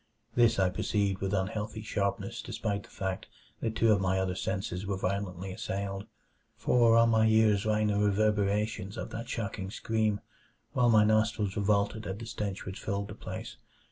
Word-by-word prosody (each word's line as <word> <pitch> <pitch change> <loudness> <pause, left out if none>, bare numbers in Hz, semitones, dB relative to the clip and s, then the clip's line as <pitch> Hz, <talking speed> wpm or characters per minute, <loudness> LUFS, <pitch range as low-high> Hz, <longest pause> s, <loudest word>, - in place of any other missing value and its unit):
This 115 -2 +4
I 95 -2 +3
perceived 100 0 0
with 95 -1 -1
unhealthy 105 +2 -2
sharpness 100 -2 -2
despite 100 -2 -3
the - - -17
fact 95 -2 -4 0.3
that 110 -1 -2
two 115 0 +4
of 100 -2 +3
my 95 0 +1
other 95 -1 0
senses 95 0 -3
were 100 -1 -1
violently 95 -1 -2
assailed. 100 +1 -4 0.5
For 115 -2 +4
on 115 0 +6
my 110 0 +4
ears 110 -2 +4
rang 110 0 +2
the 105 -1 +1
reverberations 105 0 +1
of - - -5
that 115 +2 -6
shocking 100 -5 -3
scream, 110 0 0 0.5
while 120 -1 +4
my 110 -2 +6
nostrils 110 -2 +2
revolted 105 +1 +1
at 95 - -3
the 115 - -7
stench 100 -3 -4
which 95 +1 -6
filled 100 0 -2
the - - -6
place. - - -7
105 Hz, 175 wpm, -30 LUFS, 95-110 Hz, 0.5 s, on